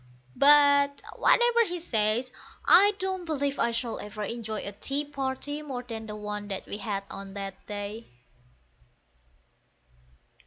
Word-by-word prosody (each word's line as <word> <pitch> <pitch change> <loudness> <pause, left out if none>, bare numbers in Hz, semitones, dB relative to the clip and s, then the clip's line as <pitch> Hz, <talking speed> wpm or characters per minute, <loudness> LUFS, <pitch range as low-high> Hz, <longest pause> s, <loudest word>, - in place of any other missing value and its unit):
But, 285 0 +5
whatever 475 -1 +4
he 355 -4 -4
says, 230 -4 +1 0.3
I 410 +2 +6
don't 380 -2 -3
believe 285 -4 -2
I 235 - +3
shall 230 0 -3
ever 210 0 -6
enjoy 225 0 -4
a 200 - -5
tea 275 +8 -3
party 285 +1 -4
more 265 -5 -6
than 225 -2 -7
the 210 - -6
one 210 0 -5
that 195 -2 -5
we - - -6
had 205 -3 -3
on 195 0 -8
that 195 -1 -7
day. 205 +2 -6
245 Hz, 140 wpm, -27 LUFS, 210-290 Hz, 0.3 s, I